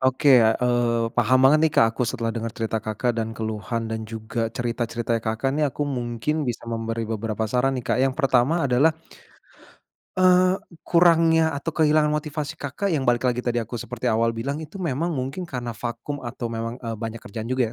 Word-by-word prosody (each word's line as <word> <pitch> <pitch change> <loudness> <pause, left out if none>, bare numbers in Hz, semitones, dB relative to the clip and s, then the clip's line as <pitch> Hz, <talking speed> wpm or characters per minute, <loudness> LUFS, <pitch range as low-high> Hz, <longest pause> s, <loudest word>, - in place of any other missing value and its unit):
Oke, 130 0 +5
eee, 115 +1 +2
paham 130 0 +3
banget 145 +3 +7
nih, 160 -1 +3
Kak, 115 0 +5
aku 120 0 -1
setelah 115 -2 -2
denger 115 0 -3
cerita 110 -1 -2
Kakak 110 +3 -1
dan 110 0 -4
keluhan 110 +1 -3
dan 110 -1 -5
juga 115 +1 -3
cerita-ceritanya 120 -1 -2
Kakak 110 +5 -1
nih 150 0 +1
aku 145 - -3
mungkin 130 +2 -2
bisa 120 - -4
memberi 115 0 -3
beberapa 110 0 -2
saran 125 +4 +1
nih, 125 - -5
Kak, 130 - 0
yang 135 0 +2
pertama 140 +2 +2
adalah. 140 +5 +3 1.2
Eee, 185 0 +5 0.3
kurangnya 165 -2 +4
atau 145 +2 -4
kehilangan 155 -1 +4
motivasi 150 -1 -3
Kakak 145 +8 -3
yang 155 -7 0
balik 120 0 +2
lagi 125 0 -1
tadi 120 -1 0
aku 115 +1 -5
seperti 120 +2 -4
awal 115 0 +2
bilang 140 +7 -4
itu 160 +6 -10
memang 165 0 -1
mungkin 135 +5 -3
karena 120 -7 -5
vakum 120 +5 -5
atau 120 0 -4
memang, 115 +1 -4
eee, 115 -2 -4
banyak 115 +1 -5
kerjaan 110 +4 -6
juga 130 -2 +1
125 Hz, 185 wpm, -24 LUFS, 115-145 Hz, 1.2 s, banget